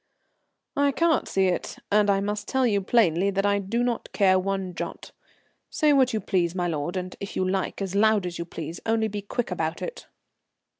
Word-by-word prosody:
"I 285 0 +3
can't 330 +3 +2
see 190 0 +2
it, 180 -1 -1
and 210 0 +4
I 195 -1 +3
must 205 +1 -3
tell 265 -1 +1
you 205 -4 +2
plainly 190 -3 +3
that 195 0 0
I 200 0 +2
do 220 +5 -1
not 240 -2 -2
care 190 -2 +4
one 190 -1 -2
jot. - - -6 0.6
Say 300 -2 +3
what 260 -2 +4
you 220 - 0
please, 180 -4 0
my 175 -1 0
lord, 165 +2 -2
and, 185 0 -5
if 200 - -7
you 185 - 0
like, 190 +1 -1
as 190 -1 -4
loud 210 -1 +3
as 175 -1 -5
you 170 - -3
please, 165 0 -7
only 225 0 +1
be 205 -1 -4
quick 215 +2 -3
about 165 -2 -2
it." - - -7
200 Hz, 205 wpm, -25 LUFS, 185-220 Hz, 0.6 s, and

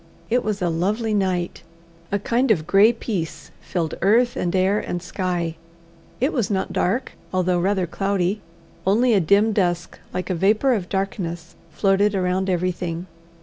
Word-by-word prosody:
It 245 +1 +2
was 210 -3 -2
a 175 - +2
lovely 210 +7 0
night. 185 -3 -1 0.5
A 200 - +2
kind 240 +6 0
of 165 -8 +2
grey 200 +6 +6
peace 200 -8 -5
filled 170 -4 -2
earth 235 +6 +3
and 180 -6 -1
air 190 +3 +3
and 175 - -3
sky. 175 -3 -3 0.6
It 265 +6 +1
was 240 -7 0
not 190 -2 -1
dark, 235 +9 0 0.2
although 185 -1 +1
rather 190 +1 +1
cloudy; 195 +2 -1 0.5
only 230 +5 +4
a 205 - +5
dim 200 +6 +3
dusk, 175 -4 -1
like 180 0 -3
a - - +2
vapour 210 +9 +3
of 190 -6 -2
darkness, 175 -4 -3 0.2
floated 200 +1 +2
around 185 0 0
everything. 180 -1 -1
190 Hz, 155 wpm, -22 LUFS, 175-210 Hz, 0.6 s, grey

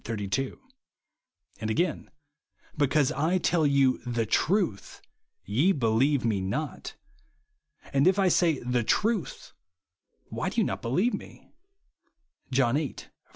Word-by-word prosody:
32); 115 +4 -3 1.0
and 110 - -3
again, 165 +8 -1 0.3
" - - -65 0.3
because 145 0 +2
I 160 +5 +1
tell 165 -3 +2
you 140 -2 +3
the 120 -2 -2
truth, 170 - 0 0.5
ye 140 - +2
believe 130 +1 +1
me 105 -4 0
not... 95 +1 -4 1.0
And 140 +4 +3
if 190 +1 +4
I 195 -1 +3
say 170 -3 +3
the 125 -1 0
truth, 210 - -1 0.8
why - - -3
do - - -2
ye - - +2
not - - -3
be 115 - -4
lieve 195 - +1
TneV - - -9 1.0
(John 125 -3 +2
viii. 150 -3 -3
135 Hz, 130 wpm, -27 LUFS, 115-170 Hz, 1.0 s, if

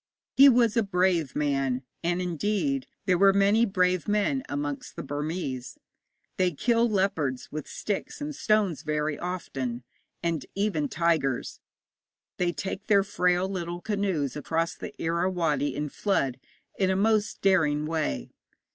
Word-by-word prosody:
He 275 +1 +9
was 235 -4 +4
a 230 - +4
brave 180 - +1
man, 135 -3 0 0.2
and, 175 +2 0
indeed, 210 - -1 0.2
there 185 -2 +2
are 195 0 +7
many 200 +4 +4
brave 185 -2 +1
men 210 +6 +1
amongst 145 0 -4
the - - -5
Burmese. 145 -3 -4 0.6
They 180 -2 +2
kill 235 - +2
leopards 185 -11 -1
with 155 -1 -5
sticks 205 -2 -4
and 300 +1 -4
stones 210 - +1
very 150 -1 -1
often, 135 -9 -4 0.4
and 165 -5 -1
even 215 +9 0
tigers. 160 - 0 0.8
They 175 -1 +1
take 190 +6 -5
their 200 -2 +5
frail 180 -2 +1
little 175 -2 -4
canoes 195 - -1
across 165 +3 -1
the - - -9
Irrawaddy 165 -4 0
in 150 - -2
flood 140 -6 -1 0.4
in 190 -2 +3
a 190 - +2
most 215 +2 +1
daring 155 -6 +3
way. 155 - -2
180 Hz, 140 wpm, -27 LUFS, 150-200 Hz, 0.8 s, He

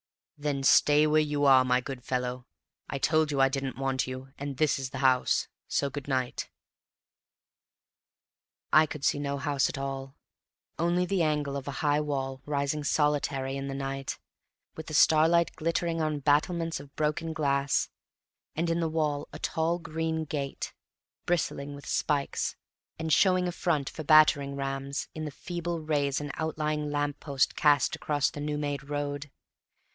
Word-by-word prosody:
"Then 145 -2 -2
stay 150 +2 +5
where 155 0 +4
you 145 -1 0
are, 135 -2 +7
my 125 0 +2
good 130 -2 -7
fellow. 125 0 -3 0.4
I 140 - -2
told 155 +2 +2
you 140 -2 -1
I 135 0 +5
didn't 135 -2 -3
want 135 -1 -1
you; 130 +1 -7
and 140 -1 -5
this 155 -2 +2
is 135 -1 -4
the 135 - -7
house. 130 -1 +3 0.2
So 140 -1 0
good 140 0 -6
night." 130 -3 -2 2.2
I 155 0 +7
could 150 -2 -5
see - - +2
no 140 -1 -2
house 140 -2 +1
at - - -5
all, 135 0 -5 0.6
only 175 +2 +2
the 190 -1 0
angle 150 -3 0
of 140 0 -5
a - - -2
high 145 0 +3
wall 135 -3 -3
rising 145 +1 -1
solitary 145 -2 0
in 135 0 -4
the 135 - -4
night, 135 0 -4 0.6
with 160 - -8
the 155 - -4
starlight 165 +3 +5
glittering 165 0 -1
on 155 -1 0
battlements 165 +3 +1
of 140 0 -13
broken 155 +2 -1
glass; 140 -2 +1 0.7
and 165 +2 0
in 165 - +1
the 165 -1 0
wall 150 -2 -1
a - - -7
tall 165 +1 0
green 160 -1 -2
gate, 140 -2 -4 0.5
bristling 145 -4 -1
with 140 - -11
spikes, 145 -2 -1 0.4
and 160 -1 -1
showing 185 +2 +4
a - - -1
front 155 -5 0
for 155 - -6
battering 145 -2 +5
rams 135 0 -3
in 155 0 -5
the - - -3
feeble 170 +3 -4
rays 145 -3 0
an 145 -1 -4
outlying 155 -1 -2
lamp 145 -1 -1
post 140 -3 0
cast 145 -3 +3
across 145 -2 0
the 145 - -7
new 150 0 -2
made 145 -2 -3
road. 145 0 -3
145 Hz, 165 wpm, -28 LUFS, 135-155 Hz, 2.2 s, are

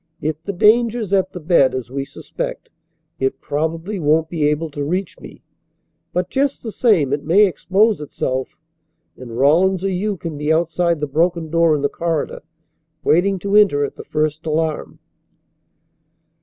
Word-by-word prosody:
If 155 +1 -3
the 200 - -4
danger's 220 +2 +2
at 190 -1 +2
the 180 - -7
bed, 155 -6 +3
as 125 -1 -5
we 135 0 -3
suspect, - - -6 0.5
it 135 0 -1
probably 165 +7 -3
won't 160 +1 +2
be 155 -4 0
able 150 +1 -2
to 145 0 -4
reach 180 +5 -3
me, - - -13 0.7
but 180 0 -2
just 275 +1 0
the 225 - -5
same 180 - +2
it 145 0 -2
may 190 +7 +5
expose 200 +1 +1
itself. 130 -3 -3 0.6
And 120 -2 -9
Rawlins 175 +8 +3
or 195 - 0
you 200 +2 -2
can 160 -3 -6
be 150 +1 0
outside 170 0 +1
the - - +1
broken 165 +2 0
door 165 -2 +3
in 145 - -3
the - - +4
corridor, 165 -1 -3 0.6
waiting 190 +4 +3
to 200 +1 +1
enter 195 -9 +5
at - - -8
the - - -9
first 155 0 -2
alarm." 155 0 -2
165 Hz, 165 wpm, -19 LUFS, 150-190 Hz, 0.7 s, may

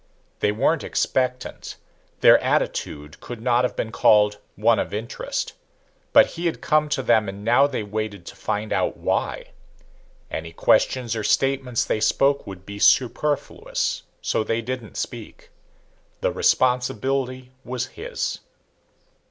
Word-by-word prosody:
They 105 - +2
weren't 135 +8 +1
expectant, 125 -1 -2 0.5
their - - +8
attitude 75 +1 -2
could 120 -2 -8
not 120 +1 +2
have 125 - -1
been 110 - -3
called 105 -2 +4 0.2
one 110 0 +3
of - - -3
interest. 110 +3 -4 0.6
But - - +8
he 170 +1 -4
had 165 - -2
come 150 0 +2
to 135 - -1
them 110 -4 +3
and 100 +1 -8
now 120 +5 +5
they 130 -6 -3
waited 105 -3 -4
to - - -9
find 105 +1 -3
out - - 0
why. - - -2 0.8
Any 80 +1 -5
questions 120 +6 +2
or 110 - -3
statements 135 +1 +1
they - - 0
spoke 140 +4 +2
would 95 -1 -9
be 100 0 -8
superfluous, 135 +6 +1 0.2
so - - 0
they 115 +1 -1
didn't 125 -1 -5
speak. - - -7 0.7
The - - +1
responsibility 130 +1 0
was 125 -1 -3
his. - - -4
120 Hz, 135 wpm, -23 LUFS, 105-130 Hz, 0.8 s, their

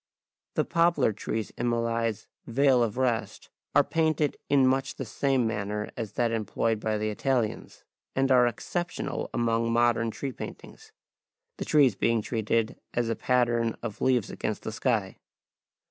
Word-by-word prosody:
The - - +2
poplar 165 -9 +2
trees 110 +1 -4
in 120 0 +1
Millais' 115 -2 -1 0.2
"Vale 130 +1 +4
of 115 -1 0
Rest" 125 -3 -1 0.2
are - - +7
painted 155 -2 +1
in 140 -2 +5
much 130 +1 +1
the 135 - -5
same 135 +2 +1
manner 105 -1 -2
as 110 -4 -5
that 120 -2 +1
employed 110 0 0
by 110 0 -1
the 110 0 -1
Italians, 120 0 -2 0.3
and 135 0 +2
are 125 -1 +6
exceptional 175 +9 -3
among 115 0 +1
modern 115 -1 +2
tree 135 +4 -4
paintings, 440 - -10 0.7
the - - -4
trees 145 -6 +5
being 115 +2 +1
treated 115 0 -1 0.2
as 120 -1 +1
a 115 - 0
pattern 120 -2 +1
of 110 -4 -5
leaves 125 -5 +2
against 105 - -3
the - - -4
sky. 110 -4 -1
115 Hz, 150 wpm, -27 LUFS, 110-130 Hz, 0.7 s, are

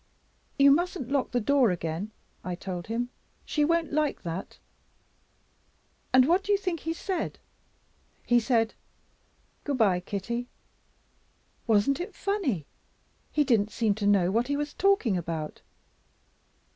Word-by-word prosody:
'You 280 -1 +7
mustn't 335 -4 0
lock 280 -2 +1
the 245 - 0
door 260 +1 +3
again,' 170 +2 -3 0.3
I 180 -1 -3
told 180 -1 -6
him, 235 +2 -2 0.4
'she 300 - +1
won't 335 -1 +1
like 305 -1 0
that'; 170 +3 -5 1.5
and 255 0 +6
what 360 +4 +3
do 410 - -1
you 405 - +5
think 365 -4 -2
he 325 - -3
said? 355 +1 -3 0.9
He 240 0 +4
said 225 -1 +1 0.9
'Good 285 -2 -1
by, 195 -6 +3
Kitty!' 225 +6 -4 1.2
Wasn't 225 +5 +3
it 355 - -5
funny? 320 - -1 0.7
He 300 - +3
didn't 225 -6 +2
seem 220 -1 +1
to 205 0 -2
know 190 -3 +4
what 230 +4 +1
he 285 0 0
was 295 0 -3
talking 390 - +2
about. 165 -3 -4
245 Hz, 135 wpm, -28 LUFS, 200-300 Hz, 1.5 s, You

